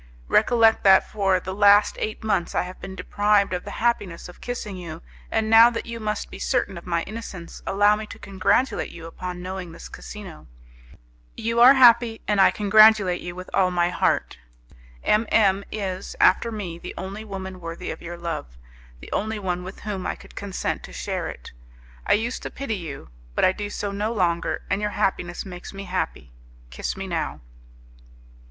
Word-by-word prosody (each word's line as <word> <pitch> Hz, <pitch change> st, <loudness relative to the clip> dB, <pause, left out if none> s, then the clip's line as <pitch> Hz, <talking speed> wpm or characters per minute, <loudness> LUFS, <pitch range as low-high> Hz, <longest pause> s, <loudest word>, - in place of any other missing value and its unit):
Recollect 225 Hz, 0 st, +4 dB
that 190 Hz, -1 st, +6 dB
for 195 Hz, -3 st, +1 dB
the 190 Hz, +1 st, -6 dB
last 205 Hz, +1 st, +5 dB
eight 215 Hz, -, -4 dB
months 200 Hz, -5 st, 0 dB
I -, -, +2 dB
have 180 Hz, +1 st, -9 dB
been 190 Hz, -, -7 dB
deprived 205 Hz, -1 st, +2 dB
of 180 Hz, -, -2 dB
the -, -, -6 dB
happiness 205 Hz, -7 st, -1 dB
of 180 Hz, -, -14 dB
kissing 235 Hz, -5 st, -5 dB
you, 170 Hz, -2 st, -8 dB, 0.3 s
and 220 Hz, -1 st, 0 dB
now 225 Hz, +2 st, +8 dB
that 235 Hz, -, -4 dB
you 235 Hz, 0 st, -6 dB
must 215 Hz, -1 st, -3 dB
be -, -, -9 dB
certain 240 Hz, -7 st, 0 dB
of 170 Hz, +1 st, -10 dB
my 170 Hz, -1 st, 0 dB
innocence, 195 Hz, -6 st, -8 dB
allow 205 Hz, +1 st, +4 dB
me 215 Hz, 0 st, -6 dB
to -, -, -10 dB
congratulate 200 Hz, +7 st, 0 dB
you 165 Hz, -1 st, -10 dB
upon 180 Hz, +2 st, -6 dB
knowing 185 Hz, -2 st, -5 dB
this 170 Hz, -, -10 dB
casino. 195 Hz, -, -10 dB, 0.9 s
You 230 Hz, +1 st, -1 dB
are 255 Hz, +3 st, +9 dB
happy, 235 Hz, -3 st, +6 dB
and 205 Hz, -2 st, +3 dB
I -, -, +7 dB
congratulate 210 Hz, -3 st, +5 dB
you 175 Hz, 0 st, -6 dB
with 185 Hz, 0 st, -9 dB
all 185 Hz, -1 st, +3 dB
my 175 Hz, -1 st, +1 dB
heart. -, -, 0 dB, 0.6 s
M 215 Hz, +2 st, +2 dB
M 200 Hz, -2 st, +4 dB
is, 195 Hz, -3 st, -4 dB
after 230 Hz, +5 st, +4 dB
me, 185 Hz, -6 st, -5 dB
the -, -, -8 dB
only 195 Hz, +3 st, -6 dB
woman 190 Hz, -3 st, -7 dB
worthy 165 Hz, 0 st, -5 dB
of -, -, -8 dB
your 170 Hz, 0 st, -7 dB
love, 165 Hz, -, -5 dB, 0.4 s
the -, -, -11 dB
only 220 Hz, +1 st, -1 dB
one 180 Hz, -3 st, -3 dB
with 185 Hz, +2 st, -9 dB
whom 200 Hz, -3 st, -4 dB
I -, -, -2 dB
could -, -, -16 dB
consent 200 Hz, -2 st, -3 dB
to 60 Hz, -, -12 dB
share -, -, -3 dB
it. -, -, -10 dB, 0.6 s
I -, -, +5 dB
used 230 Hz, +4 st, -1 dB
to -, -, -5 dB
pity 275 Hz, -4 st, -4 dB
you, 160 Hz, -, -7 dB, 0.3 s
but -, -, +3 dB
I 185 Hz, -, +5 dB
do 205 Hz, +2 st, -5 dB
so 205 Hz, -1 st, -3 dB
no 205 Hz, +3 st, -2 dB
longer, 175 Hz, -6 st, 0 dB
and 200 Hz, -, -1 dB
your 210 Hz, -, 0 dB
happiness 190 Hz, -3 st, -1 dB
makes 180 Hz, 0 st, -9 dB
me 195 Hz, -, -6 dB
happy. 180 Hz, -, -3 dB, 0.4 s
Kiss 60 Hz, -, -4 dB
me -, -, -4 dB
now." -, -, -3 dB
195 Hz, 190 wpm, -24 LUFS, 180-215 Hz, 0.9 s, are